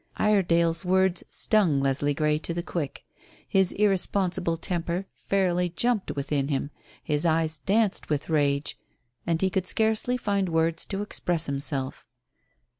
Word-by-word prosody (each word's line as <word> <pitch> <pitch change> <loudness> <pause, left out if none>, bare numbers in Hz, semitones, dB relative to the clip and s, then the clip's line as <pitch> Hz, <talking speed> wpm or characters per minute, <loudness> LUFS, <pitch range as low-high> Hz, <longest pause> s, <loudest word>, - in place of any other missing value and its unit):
Iredale's 170 -5 +2
words 190 0 +2
stung 190 -10 +2
Leslie 140 +1 +1
Grey 150 0 +1
to 165 +1 -3
the 175 - -2
quick. 165 -6 -4 0.4
His 190 -2 +2
irresponsible 190 -4 +1
temper 175 +2 -2
fairly 180 -2 0
jumped 230 +4 0
within 140 0 -1
him, 140 0 -2 0.3
his 150 0 -1
eyes 160 -2 +1
danced 205 +5 +1
with 150 -1 -1
rage, 145 -2 0 0.5
and 165 -1 +1
he 190 +1 +1
could 185 0 -1
scarcely 220 +4 +1
find 200 -5 0
words 165 0 0
to 200 0 -2
express 175 -5 -1
himself. 140 -1 -4
170 Hz, 135 wpm, -26 LUFS, 150-190 Hz, 0.5 s, Iredale's